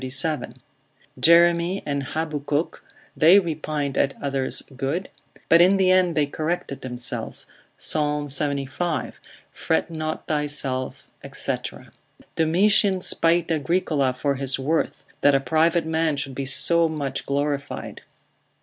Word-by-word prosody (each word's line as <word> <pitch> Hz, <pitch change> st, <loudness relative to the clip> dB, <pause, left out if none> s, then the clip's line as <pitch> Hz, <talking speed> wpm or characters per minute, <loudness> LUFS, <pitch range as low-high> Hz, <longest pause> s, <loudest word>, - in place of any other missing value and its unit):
37. 135 Hz, +4 st, -1 dB, 0.6 s
Jeremy 170 Hz, +2 st, +4 dB
and 140 Hz, -1 st, -2 dB
Habakkuk, 150 Hz, +1 st, -3 dB, 0.3 s
they 170 Hz, +5 st, +6 dB
repined 155 Hz, -5 st, -2 dB
at 135 Hz, -, 0 dB
others' 135 Hz, -2 st, -1 dB
good, 140 Hz, +8 st, -3 dB, 0.4 s
but 165 Hz, +1 st, +6 dB
in 190 Hz, +3 st, +5 dB
the 185 Hz, -1 st, +3 dB
end 185 Hz, -3 st, +3 dB
they 150 Hz, -, +3 dB
corrected 155 Hz, -1 st, -4 dB
themselves, 125 Hz, -1 st, -4 dB, 0.3 s
Psal. 150 Hz, -1 st, 0 dB
75, 140 Hz, +3 st, -2 dB, 0.3 s
fret 80 Hz, -, -1 dB
not 155 Hz, -1 st, -4 dB
thyself, 145 Hz, -4 st, -2 dB, 0.2 s
&c. -, -, 0 dB, 0.8 s
Domitian 190 Hz, +4 st, +3 dB
spited 170 Hz, -1 st, +2 dB
Agricola 155 Hz, -3 st, +1 dB
for 140 Hz, +3 st, -1 dB
his 135 Hz, 0 st, 0 dB
worth, 150 Hz, +5 st, -1 dB, 0.2 s
that 145 Hz, -1 st, +5 dB
a -, -, +4 dB
private 160 Hz, +5 st, +1 dB
man 160 Hz, -2 st, 0 dB
should 135 Hz, -1 st, -3 dB
be 135 Hz, +1 st, -4 dB
so 170 Hz, +4 st, +2 dB
much 145 Hz, -4 st, -4 dB
glorified. 140 Hz, 0 st, -3 dB
150 Hz, 120 wpm, -23 LUFS, 140-170 Hz, 0.8 s, they